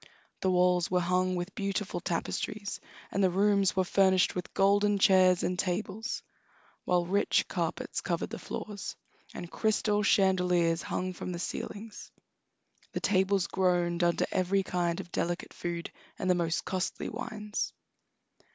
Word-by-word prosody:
The 190 - +1
walls 180 -1 +3
were 180 - +2
hung 180 +1 +1
with 175 +2 -4
beautiful 200 -2 -2
tapestries, 200 +4 -3 0.3
and 200 - +1
the 190 - +5
rooms 200 +1 +3
were 190 - +3
furnished 190 0 +3
with 180 - -5
golden 205 +1 +4
chairs 185 -2 +5
and 180 +1 -1
tables, 200 +4 -2 0.6
while 175 -1 +2
rich 200 +4 +2
carpets - - -2
covered - - -2
the - - -5
floors, 205 -3 -6 0.4
and 175 -1 -7
crystal 210 -1 +1
chandeliers 180 -4 +3
hung 185 0 -3
from 180 - -5
the - - -4
ceilings. 205 +5 -6 0.8
The - - -1
tables 190 -1 +2
groaned 175 -2 +1
under 170 -1 +2
every 190 +1 +1
kind 175 -2 -1
of 180 -2 -8
delicate 175 +1 -2
food 170 -1 -4 0.3
and 190 - -3
the 180 - +5
most 170 -1 -1
costly 185 -1 -2
wines. 210 -1 -4
185 Hz, 140 wpm, -30 LUFS, 175-200 Hz, 0.8 s, the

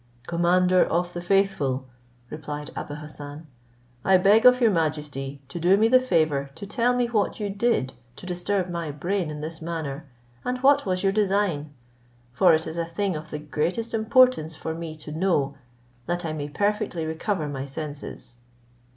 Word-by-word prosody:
"Commander 180 +2 +3
of 175 +1 -1
the 175 - -4
faithful," 175 -9 +1 0.5
replied 150 -1 -6
Abou 145 - -5
Hassan, 150 0 -9 0.6
"I 190 -1 +5
beg 205 +6 +6
of 250 0 +6
your 230 -3 +4
majesty 150 -4 -2
to 155 +5 -6
do 180 +4 +4
me 220 +2 +4
the 255 +2 +6
favour 155 - +1
to - - -8
tell 240 +4 +1
me 245 -1 +2
what 230 -3 0
you 205 -2 -2
did 200 - 0 0.2
to - - -11
disturb 180 +1 -1
my 170 -3 -4
brain 170 +4 -2
in 150 -1 -6
this 160 +1 -6
manner, 160 -3 -4 0.4
and 250 0 -1
what 280 -3 +5
was 185 0 0
your 195 - +3
design; 195 -8 +1 0.6
for 180 +6 +5
it 160 - -2
is 160 +1 -6
a 170 - 0
thing 185 +2 -1
of 155 0 -7
the - - -4
greatest 155 +10 -2
importance 225 - +3
for 160 - -4
me 165 -1 -6
to 150 0 -9
know, 155 -4 +1 0.5
that 175 0 -2
I 160 - -2
may 145 -1 -4
perfectly 205 -1 -1
recover 160 +1 -2
my 135 -2 -4
senses." 145 -4 -8
170 Hz, 175 wpm, -25 LUFS, 150-200 Hz, 0.6 s, beg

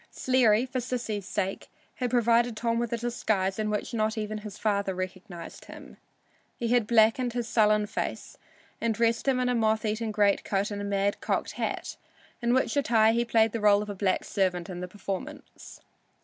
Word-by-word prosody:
Sleary, 245 -3 +3
for 255 0 -3
Sissy's 230 -5 -3
sake, 195 -2 -3 0.3
had 250 -1 -1
provided 235 -1 +2
Tom 230 0 0
with 235 -1 -2
a 235 - 0
disguise 220 -5 -1
in 215 0 0
which 210 +2 -3
not 220 -1 0
even 215 0 -3
his 210 -1 -9
father 200 -3 0
recognized 185 -1 -7
him. - - -12 0.6
He 235 - -2
had 240 -3 +2
blacked 235 +2 +3
his 240 -1 -2
sullen 210 -2 +3
face 210 - -4 0.5
and 230 -1 0
dressed 230 +3 +1
him 260 -2 +3
in 250 - +1
a 250 - +1
moth 220 -1 +1
eaten 220 +1 -1
greatcoat 205 -1 +1
and 205 0 -4
a - - -4
mad 200 0 0
cocked - - -1
hat, - - -4 0.4
in 235 0 +1
which 260 - +1
attire 225 -6 +4
he 235 +1 +2
played 225 -2 +3
the 230 - -3
rôle 210 -1 +4
of 210 - -6
a - - -4
black 190 -1 0
servant 185 -1 -1
in 175 - -6
the 180 - -5
performance. 195 0 -7
220 Hz, 190 wpm, -27 LUFS, 205-235 Hz, 0.6 s, attire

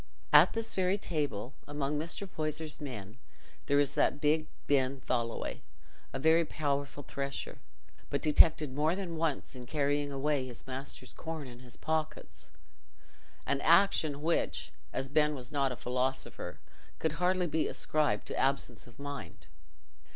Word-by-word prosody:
At - - +9
this 225 0 -1
very 185 +1 +2
table, 145 - -2
among 145 0 -1
Mr. 170 +5 -4
Poyser's 155 -2 -3
men, 110 -5 -7 0.5
there 140 0 +4
is 145 -1 +2
that - - +2
big 155 +1 +2 0.2
Ben 135 -1 +2
Tholoway, 115 -3 -2 0.5
a - - -3
very 160 +4 +5
powerful 145 -2 -2
thresher, 140 +1 -4 0.5
but - - 0
detected 155 -2 +5
more 155 +5 +2
than 185 -4 -4
once 160 -4 -1
in 125 -1 -8
carrying 145 0 +1
away 140 -1 0
his 120 -3 -8
master's 130 -1 -6
corn 160 -2 -5
in 120 -1 -10
his 125 -1 -10
pockets—an 160 0 -3 1.1
action 160 -4 +4
which, 170 +1 0 0.2
as 135 +1 -2
Ben 150 +1 +3
was 125 -2 -8
not 140 -2 +1
a - - -3
philosopher, 125 -7 -2 0.4
could 160 - 0
hardly 180 0 +3
be 160 -1 +1
ascribed 155 -1 +1
to - - -5
absence 135 -4 +1
of 120 - -16
mind. 110 -9 -7
145 Hz, 145 wpm, -32 LUFS, 130-155 Hz, 1.1 s, At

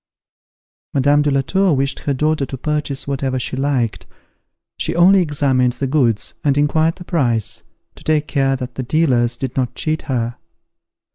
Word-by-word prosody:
Madame 145 +2 +4
de 145 - +1
la 135 -1 +2
Tour 190 +5 +1
wished 135 +1 -1
her 145 - -1
daughter 150 +1 +1
to 135 - -6
purchase 150 0 -2
whatever 135 -1 -1
she 130 - -3
liked; 130 -5 -1 0.7
she - - -2
only 185 +3 +6
examined 135 -6 +1
the 130 +3 -3
goods, 130 -6 +1
and 140 -1 +2
inquired 155 +3 +2
the 180 - -10
price, 125 - -1 0.3
to - - -16
take 155 -1 +1
care 135 -2 +1
that 125 -1 -6
the 130 - -4
dealers 125 -4 +1
did 130 -1 -4
not 130 -2 -1
cheat 155 0 -2
her. 120 -2 -1
140 Hz, 165 wpm, -19 LUFS, 130-150 Hz, 0.7 s, only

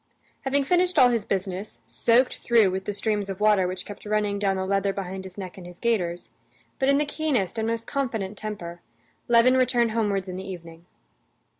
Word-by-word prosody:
Having 275 +1 +2
finished 360 +5 +2
all 250 - +7
his 230 -4 0
business, 190 +1 -3
soaked 245 +2 +2
through 225 -5 +4
with 190 0 -4
the - - -1
streams 205 0 -1
of 195 0 -5
water 210 -3 +4
which 185 0 -4
kept 205 - -10
running 210 -1 0
down 195 -1 +1
the 190 - -2
leather 195 0 +1
behind 190 -1 -5
his 185 0 -11
neck 190 -1 -7
and 175 - -10
his 175 -1 -12
gaiters, 180 -7 -1 0.5
but 270 - +2
in 280 - +5
the 295 - +1
keenest 265 - -1
and 220 - -1
most 230 0 -2
confident 225 -8 -2
temper, 185 -5 -6 0.5
Levin 240 +2 +5
returned 245 -3 +2
homewards 205 -4 0
in 185 0 -5
the 190 - -5
evening. 170 -2 -10
205 Hz, 195 wpm, -25 LUFS, 190-235 Hz, 0.5 s, all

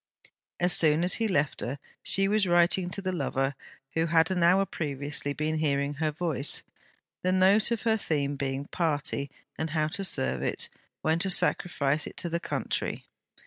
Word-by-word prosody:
As 175 +1 +5
soon 155 0 +3
as 180 - +4
he 225 - +2
left 150 -8 0
her, 130 +4 -4 0.2
she 195 0 +4
was 205 -1 +2
writing 175 +1 +3
to 195 +2 -5
the 185 - -1
lover 135 -4 -1 0.4
who 165 0 +1
had 165 +2 +3
an 180 -2 0
hour 185 +3 +4
previously 145 -3 -3
been 155 +2 -2
hearing 140 -2 0
her 155 +1 -1
voice; 155 -3 -2 0.6
the 185 - 0
note 190 +4 +4
of 235 -2 -2
her 225 -1 +2
theme 145 -7 -1
being 135 0 -3
Party; 150 -4 -2 0.3
and 160 - -2
how 155 0 0
to 195 - -5
serve 65 - +1
it, - - 0 0.3
when 160 +1 +1
to 190 - -1
sacrifice 155 -5 +2
it - - -11
to 170 - -2
the 170 +1 -1
Country. - - -3
160 Hz, 180 wpm, -28 LUFS, 145-185 Hz, 0.6 s, As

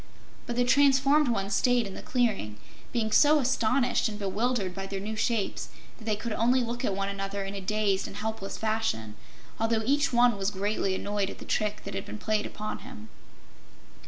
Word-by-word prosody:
But 240 - -3
the 245 0 +2
transformed 280 +2 +4
ones 200 -4 0
stayed 245 +3 +3
in 195 - -7
the - - -7
clearing, 225 - 0 0.3
being 220 -3 -1
so 300 +6 +6
astonished 250 -2 +2
and 210 - -6
bewildered 205 0 -1
by 195 +1 -5
their 195 0 -4
new 215 +3 -4
shapes 220 -1 -1 0.3
that 220 - -12
they 215 -1 +1
could 215 +2 -4
only 245 +3 +3
look 235 +1 -4
at 195 - 0
one 195 0 -1
another 200 0 -3
in 195 +1 -5
a 200 - -5
dazed 200 0 0
and - - -9
helpless 220 -2 -4
fashion, 215 - -1 0.5
although 225 0 +1
each 285 +3 +2
one 240 -2 +4
was 195 0 +1
greatly 200 -1 -1
annoyed 205 0 -1
at - - -8
the - - -10
trick 210 0 -1
that - - -6
had 195 0 -4
been - - -6
played 215 0 -1
on 215 0 -4
him. 110 +1 -11
215 Hz, 195 wpm, -28 LUFS, 195-240 Hz, 0.5 s, so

